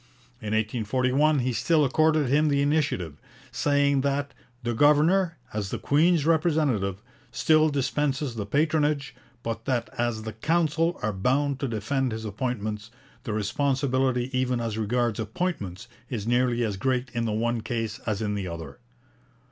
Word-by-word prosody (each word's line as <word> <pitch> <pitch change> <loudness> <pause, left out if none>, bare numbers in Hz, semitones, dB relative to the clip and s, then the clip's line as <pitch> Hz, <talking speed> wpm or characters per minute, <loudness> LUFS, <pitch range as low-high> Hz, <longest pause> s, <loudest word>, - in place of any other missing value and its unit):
In 110 0 -2
1841 125 +7 +1
he 125 0 -1
still 150 +7 +2
accorded 155 +1 +2
him 150 +4 +3
the 140 -1 +2
initiative, 140 - -1 0.3
saying 140 +2 +2
that 140 +1 -1 0.3
'the 120 0 -1
governor, 155 +7 +3 0.2
as 105 -2 -2
the - - -3
Queen's 160 +1 +3
representative, 150 - +1 0.3
still 155 0 +3
dispenses 140 -1 -1
the 105 -3 -5
patronage, 150 +1 +1 0.3
but 115 0 -4
that 125 -4 -1
as 120 -2 -1
the 110 0 -5
Council 165 - +1
are 105 0 0
bound 135 +7 0
to 140 - -1
defend 120 +3 -1
his 110 0 -5
appointments, 110 -1 -3 0.4
the 110 - -2
responsibility 130 +3 0
even 125 -1 +1
as 115 -2 -2
regards 115 +1 0
appointments 110 - -3 0.2
is 110 -5 -4
nearly 120 0 +2
as 105 -4 -2
great 130 +2 -1
in 115 -1 -1
the 110 - -1
one 115 +2 0
case 115 0 -3
as 110 -1 -1
in 105 -1 -1
the 100 -2 -3
other.' 85 -2 -7
125 Hz, 150 wpm, -26 LUFS, 110-145 Hz, 0.4 s, him